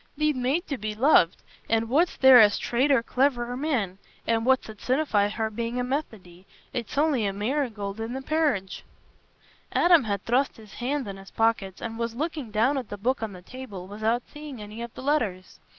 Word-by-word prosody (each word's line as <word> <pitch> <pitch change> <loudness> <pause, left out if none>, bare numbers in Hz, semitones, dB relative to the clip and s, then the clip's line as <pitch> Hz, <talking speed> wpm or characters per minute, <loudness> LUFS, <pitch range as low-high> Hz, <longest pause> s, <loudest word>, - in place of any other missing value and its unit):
Thee't 305 -1 +1
made 265 +8 0
to 280 -4 -4
be 215 0 -4
loved—for 225 - +2
where's 285 +11 +1
there 265 -2 +8
a 215 -2 +8
straighter 245 +4 +1
cliverer 245 -1 0
man? 245 - -1 0.3
An' 225 0 +1
what's 260 0 +3
it 215 -2 -10
sinnify 250 -7 +1
her 220 0 -2
bein' 235 +2 -3
a 250 - 0
Methody? 215 - -5 0.3
It's 240 +1 -5
on'y 285 -8 +2
the - - 0
marigold 215 -2 -2
i' 225 - -2
th' 265 +3 -6
parridge." 280 - 0 0.9
Adam 345 -7 +5
had 200 -2 -2
thrust 255 +4 +1
his 215 -3 -14
hands 265 +1 -2
in 195 -1 -6
his 195 0 -12
pockets, 225 -4 0
and 225 0 -5
was 230 -1 -2
looking 300 -3 -3
down 235 +7 +2
at 245 - -8
the 205 - -6
book 245 +6 0
on 220 -3 -4
the 180 -1 -12
table, 220 -6 -8
without 220 +4 -1
seeing 295 -4 -9
any 210 +2 -8
of 235 0 -6
the - - -8
letters. 225 -11 -1
235 Hz, 190 wpm, -26 LUFS, 210-270 Hz, 0.9 s, there